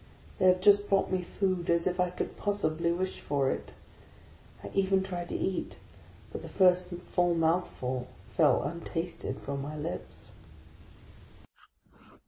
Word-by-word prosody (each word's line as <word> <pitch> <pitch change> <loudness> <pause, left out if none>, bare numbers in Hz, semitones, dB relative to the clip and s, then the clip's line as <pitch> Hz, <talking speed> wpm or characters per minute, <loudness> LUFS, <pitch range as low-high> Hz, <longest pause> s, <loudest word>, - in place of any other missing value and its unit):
They 185 - +4
have 185 0 +5
just 205 +1 +5
brought 195 -1 +2
me 185 -1 +1
food, 185 -1 -1
as 170 0 +3
if 180 0 -1
I 180 0 +3
could 180 - -4
possibly 170 -5 0
wish 185 +2 -2
for 140 -2 0
it! - - -5 0.9
I - - -7
even 195 -1 +2
tried 175 -2 -5
to - - -4
eat, 190 - -2 0.5
but - - -6
the - - -8
first 180 -1 +4 0.2
mouthful 165 -7 +1 0.2
fell - - +4
untasted 170 +2 -4
from 140 0 -4
my 150 +2 -5
lips. 155 +3 -6
180 Hz, 135 wpm, -30 LUFS, 165-185 Hz, 0.9 s, have